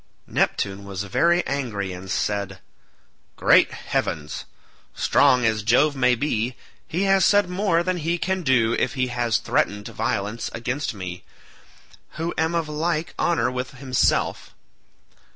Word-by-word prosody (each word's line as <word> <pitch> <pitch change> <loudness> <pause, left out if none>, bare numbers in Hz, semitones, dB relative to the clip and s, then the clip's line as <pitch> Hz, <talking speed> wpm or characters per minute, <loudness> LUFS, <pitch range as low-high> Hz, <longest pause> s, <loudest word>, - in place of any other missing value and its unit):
Neptune 100 0 -1
was 100 0 -5
very 170 - +2
angry 110 -9 -3
and 90 +1 -9
said, 100 0 -1 0.8
"Great - - +5
heavens! 75 -1 -3 0.5
strong 130 -4 +4
as 110 -1 +1
Jove 130 +7 +3
may 125 -2 +3
be, 120 -2 -1 0.3
he 175 +4 -1
has 195 -1 +4
said 205 0 +4
more 180 -3 +1
than 185 0 -1
he 170 +1 -1
can 190 +2 -1
do 125 -7 +2
if - - -1
he 130 -1 0
has 120 -2 +1
threatened 105 0 -1
violence 105 +3 -2
against 125 +2 -3
me, 90 -2 -7 0.9
who 165 +2 -3
am 160 +1 0
of 165 -2 0
like 155 +1 -2
honour 125 -8 +1
with 125 0 -5
himself. 130 -2 0
125 Hz, 135 wpm, -23 LUFS, 105-165 Hz, 0.9 s, Great